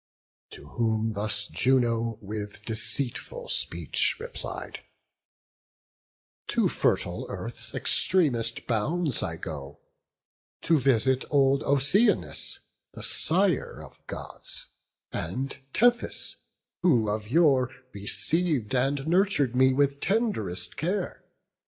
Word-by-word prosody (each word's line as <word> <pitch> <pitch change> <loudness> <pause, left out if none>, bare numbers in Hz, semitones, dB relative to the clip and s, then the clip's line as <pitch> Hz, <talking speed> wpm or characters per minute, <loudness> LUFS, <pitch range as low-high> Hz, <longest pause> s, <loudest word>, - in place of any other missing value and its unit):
To 70 - -12
whom 110 +3 -1
thus 105 0 +1
Juno 115 -2 +1
with 105 0 -6
deceitful 115 +3 -1
speech 85 -5 +2
Replied: - - -6 1.7
"To - - +2
fertile - - -1
earth's - - -5
extremest 145 -11 +3
bounds 140 +6 +1
I 80 -3 -3
go, 75 -3 -8 0.9
to 165 -2 +3
visit 130 0 +2
old 140 -1 +3
Oceanus, 140 - +1 0.3
The - - -8
sire 180 -1 +1
of - - -16
Gods, - - -4 0.4
and 135 +2 -3 0.2
Tethys, 240 - +1 0.4
who 125 -12 +3
of 105 0 -3
yore 135 -4 +3 0.2
Receiv'd, 105 - 0
and 135 +3 +1
nurtur'd 170 - +2
me 130 +1 +5
with 140 +1 +1
tend'rest 140 - -1
care. 180 +3 -3
130 Hz, 95 wpm, -27 LUFS, 105-155 Hz, 1.7 s, me